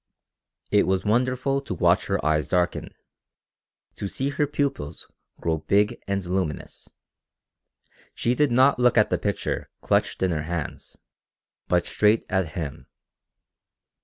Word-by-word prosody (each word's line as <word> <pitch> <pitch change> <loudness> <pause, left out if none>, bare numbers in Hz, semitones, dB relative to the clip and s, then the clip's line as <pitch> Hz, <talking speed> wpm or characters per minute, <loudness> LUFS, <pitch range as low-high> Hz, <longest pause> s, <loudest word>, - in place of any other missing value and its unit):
It 105 - +4
was 95 0 0
wonderful 130 +5 +1
to 140 - -5
watch - - +3
her - - -1
eyes 75 -1 +2
darken, 90 -1 0 1.1
to 100 - -3
see 135 +7 -2
her 145 +1 0
pupils 140 - -3 0.3
grow 80 -1 -1
big 100 +6 +1
and 100 -1 -1
luminous. 90 -4 -3 1.3
She 120 - +1
did 145 0 +2
not 130 +2 +4
look 125 -1 +4
at 105 - +4
the - - +1
picture 100 -1 -2
clutched - - +1
in 95 - +2
her 80 -2 -1
hands, 80 0 -5 0.7
but 90 -1 +2
straight 105 +1 +2
at 95 -5 0
him. 75 -6 -5
100 Hz, 135 wpm, -25 LUFS, 85-125 Hz, 1.3 s, It